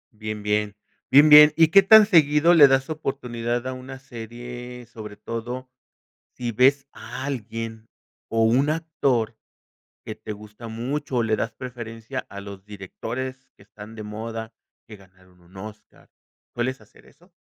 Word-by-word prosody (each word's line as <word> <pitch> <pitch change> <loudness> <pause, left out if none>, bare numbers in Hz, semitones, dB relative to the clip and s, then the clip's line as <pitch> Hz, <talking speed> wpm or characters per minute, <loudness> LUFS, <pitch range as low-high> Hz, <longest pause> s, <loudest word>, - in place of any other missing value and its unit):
Bien, 110 -1 -6
bien, 105 0 0 0.3
bien, 145 +3 +7
bien, 150 0 +9
¿y 165 -1 +5
qué 195 +4 +7
tan 215 +2 +8
seguido 160 -3 +4
le 150 -4 +9
das 135 0 +2
oportunidad 120 -5 -3
a 130 - -3
una 130 +1 -9
serie?, 120 0 -9
sobre 110 -2 -10
todo, 120 +4 -6 0.6
si 120 -1 -4
ves 135 +4 +3
a 130 - -8
alguien, 115 -3 -5 0.4
o 115 0 +1
un 130 +6 +3
actor 135 -8 -1 0.7
que - - -6
te 110 - -8
gusta 105 +2 -11
mucho 130 +5 -4
o 120 - +3
le 110 -1 +1
das 115 - -3
preferencia 120 0 -7
a 100 0 -9
los 100 -1 -11
directores 115 +6 -7
que - - -19
están 105 +2 -13
de 110 - -8
moda, 110 +1 -6 0.3
que 110 - -11
ganaron 95 -1 -22
un 90 +2 -20
Óscar, 105 +2 -12 0.4
¿sueles 130 +3 -2
hacer - - -21
eso? 175 +6 -23
120 Hz, 155 wpm, -24 LUFS, 110-135 Hz, 0.7 s, bien